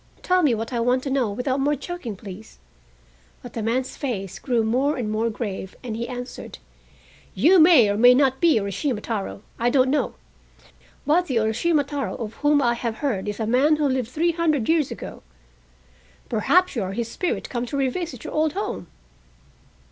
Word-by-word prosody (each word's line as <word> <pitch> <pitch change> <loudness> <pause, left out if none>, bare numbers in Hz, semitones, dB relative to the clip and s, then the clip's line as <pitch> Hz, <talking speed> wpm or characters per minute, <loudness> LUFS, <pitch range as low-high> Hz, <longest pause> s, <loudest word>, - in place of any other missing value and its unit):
Tell 365 0 +3
me 280 -8 +3
what 225 +3 -5
I 240 - 0
want 250 +2 +1
to 275 - -3
know 260 -5 +1
without 255 +6 -2
more 290 +2 +2
joking, 280 - -6
please." 200 +2 -11 0.9
But - - -10
the 225 - -3
man's 250 +4 -1
face 195 - -4
grew 240 -4 0
more 260 +7 +1
and 220 -4 -2
more 220 +2 0
grave, 200 -4 -5
and 235 -3 -4
he 235 +1 -4
answered: 245 0 -7 0.8
"You 365 +3 +5
may 315 - +7
or 205 - 0
may 245 +3 +7
not 265 -1 +2
be 335 -7 +5
Urashima 205 +5 -2
Taro, 210 -2 -4 0.2
I 240 +1 +2
don't 260 0 +3
know. 295 - 0 0.9
But 350 +4 +2
the 260 - -2
Urashima 235 +9 +2
Taro 280 -1 -3
of 225 -3 -6
whom 290 -1 +3
I 240 -1 +3
have 235 -1 -3
heard 210 -7 -1
is 205 - -5
a 220 - -1
man 265 +7 +3
who 300 -1 0
lived 260 -3 -1
three 330 +6 +1
hundred 315 -8 0
years 320 -4 +2
ago. - - -8 1.1
Perhaps 340 - +2
you 230 - -1
are 190 0 -3
his 235 +2 -2
spirit 360 +9 -3
come 245 -1 -2
to 280 - -3
revisit 295 +7 -2
your 310 - -7
old 310 -1 +1
home?" 405 - -4
250 Hz, 190 wpm, -23 LUFS, 225-295 Hz, 1.1 s, may